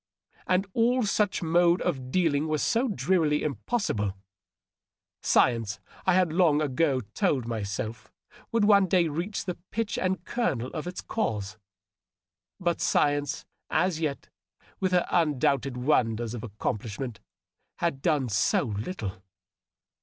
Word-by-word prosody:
And 185 +2 +2
all 245 +2 +3
such 205 -2 +1
mode 170 +1 +4
of 130 -7 -2
dealing 155 -2 +1
was 155 -1 0
so 240 +3 +2
drearily 175 -8 +1
impos 205 - -1
sible! 105 -2 -2 1.1
Science, 115 -4 +2 0.3
I 185 - +5
had 180 -4 +3
long 165 -4 +4
ago 140 -2 +1
told 145 - +1
myself, 110 0 -4 0.4
would 230 -3 +3
one 200 -2 +6
day 175 -2 +3
reach 175 +7 -3
the 180 - -4
pith 225 -1 -2
and 185 -1 -1
kernel 130 - -1
of 155 +2 -4
its 180 0 -5
cause. 110 - -3 1.0
But 175 -2 0
science 145 0 +1 0.2
as 175 0 +1
yet, 150 -4 -3 0.5
with 185 -1 0
her 180 -1 +3
undoubted 140 -5 +1
wonders 120 -4 +1
of 120 - -6
accomplishment, 110 +2 -4 0.6
had 165 -6 -1
done 150 -6 +1
so 110 +3 +2
little 105 - -4
155 Hz, 130 wpm, -27 LUFS, 120-185 Hz, 1.1 s, one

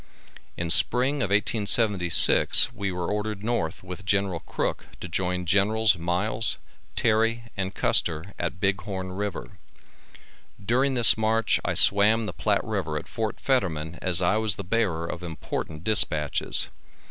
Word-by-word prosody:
In 85 -1 -3
spring 125 - +1
of 130 -9 -3
1876, 100 -3 +5
we 100 -1 -5
were 90 0 -5
ordered 105 -1 -5
north 105 -10 -4
with 90 0 -10
General 95 -2 -1
Crook - - -5
to - - -8
join 90 +1 -4
Gen'ls 105 +3 +1
Miles, 90 +7 +1 0.4
Terry 115 +1 -1
and 95 0 -5
Custer 85 +4 0
at 85 0 -5
Big 95 0 -1
Horn 95 -2 -7
river. 95 -10 -7 1.0
During 130 +6 -1
this 115 -2 +5
march 110 +1 0
I - - -3
swam 105 +3 +3
the - - -7
Platte 105 -2 -2
river 95 -8 -5
at - - -8
Fort 110 -2 -6
Fetterman 85 - -3
as 90 -1 -1
I 90 +4 0
was 110 -2 -1
the 100 - -8
bearer 95 -5 -2
of 85 +1 -8
important 80 -2 -7
dispatches. 75 -8 +3
100 Hz, 145 wpm, -23 LUFS, 90-110 Hz, 1.0 s, 1876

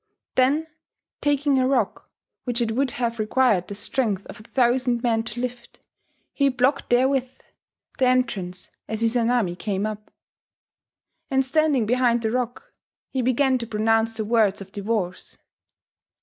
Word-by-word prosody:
Then 275 +5 +3 0.6
taking 285 -1 +2
a 255 - +2
rock 270 0 0 0.3
which 245 -1 -1
it 230 -2 0
would 265 +4 +1
have 235 -1 -1
required 215 -4 +2
the 200 - -6
strength 205 -1 -1
of - - -10
a - - -13
thousand 245 -1 +1
men 230 -2 +2
to 230 +1 -6
lift, 245 -1 -6 0.5
he 280 -1 +3
blocked 260 +2 +1
therewith 255 +1 +2 0.7
the 260 - +4
entrance 200 -8 -1 0.2
as 220 +1 -3
Izanami 230 -5 +1
came 195 +1 -2
up. 215 -1 -6 1.2
And 265 0 +2
standing 290 -3 +2
behind 240 0 +2
the 220 - 0
rock, 250 - -3 0.4
he 260 - -1
began 255 +1 +2
to 230 - -5
pronounce 225 +1 +1
the 220 - -2
words 215 -3 +2
of 195 -1 -10
divorce. 200 -3 -3
240 Hz, 145 wpm, -24 LUFS, 220-260 Hz, 1.2 s, the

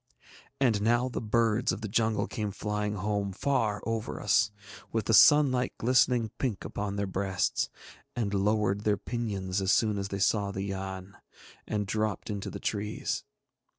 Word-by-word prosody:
And 115 -6 +2
now 120 +3 +2
the 125 - -4
birds 115 +1 +2
of - - -4
the 110 - -3
jungle 110 +1 +1
came 105 -2 -3
flying 105 +1 -2
home 100 0 -1
far 105 -1 0
over 115 -1 -3
us, 105 +2 +3 0.4
with 110 -3 -1
the 115 - +1
sunlight 130 0 +6
glistening 125 -2 +3
pink 120 -8 -2
upon 100 -1 -3
their 100 0 -1
breasts, 95 -1 -1 0.5
and 110 -5 -1
lowered 100 0 +1
their 105 -1 +1
pinions 100 -6 -3
as 95 0 +2
soon 105 -3 +2
as 100 - -2
they 100 - -4
saw 100 +1 +2
the 95 0 -4
Yann, 95 -1 -5 0.5
and 105 -1 -1
dropped 110 +1 -2
into 100 -2 -4
the - - -7
trees. 105 0 -2
105 Hz, 160 wpm, -29 LUFS, 100-115 Hz, 0.5 s, sunlight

